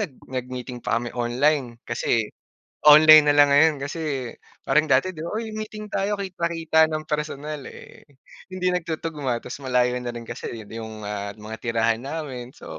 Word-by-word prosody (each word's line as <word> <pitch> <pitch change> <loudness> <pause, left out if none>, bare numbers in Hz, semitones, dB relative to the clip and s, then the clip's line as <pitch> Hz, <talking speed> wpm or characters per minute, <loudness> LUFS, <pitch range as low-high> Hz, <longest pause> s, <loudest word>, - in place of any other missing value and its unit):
nag 180 -10 -3
nag-meeting 125 -1 -6
pa 115 - 0
kami 120 0 -3
online 125 +1 0
kasi 110 -2 -1 0.5
online 155 0 +9
na 145 - +4
lang 145 -1 +6
ngayon 145 0 +4
kasi 140 -4 -3 0.3
parang 150 +3 +2
dati 140 +6 +3
'di 170 - -13
ba, 170 - -5
"Uy 225 0 -3
may 215 0 -5
meeting 215 -1 -9
tayo," 200 +1 0
kita-kita 170 -5 +1
ng 155 0 -3
personal, 150 -1 -4
eh, - - -13 0.4
hindi 185 -1 -1
nagtutuguma 160 -7 -3
ta's - - -7
malayo 125 -2 +1
na 120 -1 -5
rin 120 - -6
kasi, 115 - -7
eh, 115 - -8
yung 105 - -15
di 115 - -7
ma 105 -2 -6
mga 110 +1 -9
tirahan 115 -1 0
namin, 130 -2 -6
so 80 - -10
140 Hz, 180 wpm, -24 LUFS, 120-160 Hz, 0.5 s, online